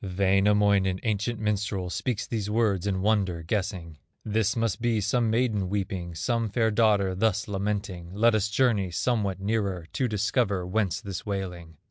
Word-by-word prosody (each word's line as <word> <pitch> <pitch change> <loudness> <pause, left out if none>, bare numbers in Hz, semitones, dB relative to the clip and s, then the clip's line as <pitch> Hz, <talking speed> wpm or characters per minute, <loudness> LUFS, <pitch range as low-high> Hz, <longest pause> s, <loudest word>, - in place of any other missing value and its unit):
Wainamoinen, 100 0 +2
ancient 110 +1 -1
minstrel, 100 -3 -1
Speaks 125 0 -2
these 105 -3 -3
words 105 -4 +1
in 95 -2 -1
wonder, 95 -6 +1
guessing: 85 -4 -3 0.3
"This 110 -1 +1
must 115 -2 -1
be 115 -2 +1
some 115 +3 +1
maiden 110 -5 +1
weeping, 95 -4 -3
Some 115 +4 -1
fair 110 +1 +1
daughter 105 -3 +3
thus 105 +1 0
lamenting; 100 -3 -3
Let 115 +2 +4
us 105 -1 +1
journey 110 -4 +2
somewhat 100 0 -1
nearer, 100 -4 -1
To 130 - 0
discover 105 -3 0
whence 95 0 -1
this 100 -5 -6
wailing." 90 -5 -5
100 Hz, 150 wpm, -27 LUFS, 95-110 Hz, 0.3 s, Let